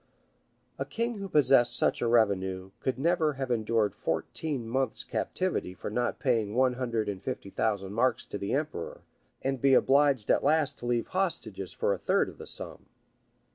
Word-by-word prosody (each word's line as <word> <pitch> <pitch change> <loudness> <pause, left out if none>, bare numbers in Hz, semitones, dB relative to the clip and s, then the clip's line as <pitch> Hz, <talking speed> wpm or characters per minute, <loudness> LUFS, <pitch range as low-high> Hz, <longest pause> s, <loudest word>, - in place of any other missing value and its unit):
A - - 0
king 230 -1 -3
who 195 -1 -5
possessed 135 -6 +5
such - - +2
a 120 - +1
revenue, 95 -5 +1
could 130 -2 -2
never 160 +1 +2
have 135 -2 -4
endured 110 -2 +1
fourteen 140 -8 -3
months' 130 0 0
captivity 180 - -2
for 90 - -6
not 120 +3 -1
paying 110 -2 0
one 130 0 +3
hundred 120 -3 -2
and 100 -2 -4
fifty 100 - -5
thousand 100 -3 -1
marks 120 +1 +1
to 100 - -6
the 100 - -3
emperor, 145 - -4 0.4
and 135 -2 -1
be 135 -1 +5
obliged 140 -5 +3
at - - +2
last 150 -1 +2
to 120 - -6
leave 120 -1 0
hostages 155 - -2
for 100 - 0
a 95 - -5
third - - +1
of - - -14
the - - -8
sum. - - -4
120 Hz, 175 wpm, -29 LUFS, 105-140 Hz, 0.4 s, possessed